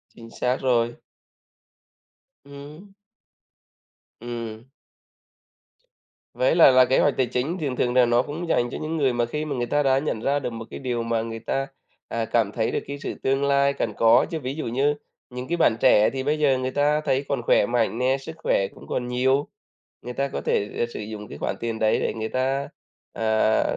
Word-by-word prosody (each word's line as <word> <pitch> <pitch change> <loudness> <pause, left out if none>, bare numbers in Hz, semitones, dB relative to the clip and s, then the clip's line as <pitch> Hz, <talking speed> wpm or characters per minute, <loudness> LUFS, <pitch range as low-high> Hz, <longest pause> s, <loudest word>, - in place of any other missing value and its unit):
Chính 115 -1 -12
xác 125 +1 +1
rồi. 120 -2 +1 1.5
Ừm. 150 +8 -12 1.3
Ừm. 115 -2 -6 1.7
Với - - +2
lại - - +8
là 130 0 +6
kế 130 - +2
hoạch 145 - +3
tài 130 - +3
chính, 130 +9 -2
thường 135 -4 -2
thường 125 0 0
là 125 -1 +5
nó 120 +1 +3
cũng 155 +6 -6
dành 120 -4 +2
cho - - -5
những 160 +1 -3
người 135 -4 +2
mà 120 0 +1
khi 150 +6 -4
mà 145 -3 -3
người 120 - -1
ta 145 +4 +1
đã 135 -1 +3
nhận 140 -6 -2
ra 140 +4 +1
được 135 - -3
một 115 0 -7
cái - - -7
điều 120 -3 -2
mà 115 -1 0
người 115 0 -5
ta, 135 +4 -2 0.4
à, 115 -1 -2
cảm 110 -2 +1
thấy 110 0 -1
được - - 0
cái 140 - -5
sự - - -4
tương 135 +1 +1
lai 140 0 +3
cần 110 -6 -2
có. 115 0 +5
Chứ 160 - -2
ví 135 0 -4
dụ 160 - -4
như 135 +5 +1 0.3
những 125 +1 -7
cái 175 - -1
bạn 120 -9 +3
trẻ 105 +1 +5
thì 135 -1 -4
bây 150 +2 0
giờ 140 -3 +3
người 130 0 -2
ta 150 +2 +2
thấy 140 -2 0
còn 135 -3 -1
khỏe 120 - +3
mạnh 120 -2 0
nè, 130 +2 +2
sức 160 +4 -9
khỏe 100 -10 +1
cũng - - -14
còn 125 - -2
nhiều, 130 +3 +1 0.6
người 125 - -6
ta 140 +2 -1
có - - -4
thể, 100 - 0
ờ, 120 - +1
sử 120 - -8
dụng 105 0 -7
cái - - -9
khoản - - -2
tiền 115 -1 -3
đấy 110 -1 +2
để - - -1
người 110 0 -3
ta, 135 +3 -1 0.4
à, 110 0 +2
130 Hz, 210 wpm, -24 LUFS, 115-140 Hz, 1.7 s, lại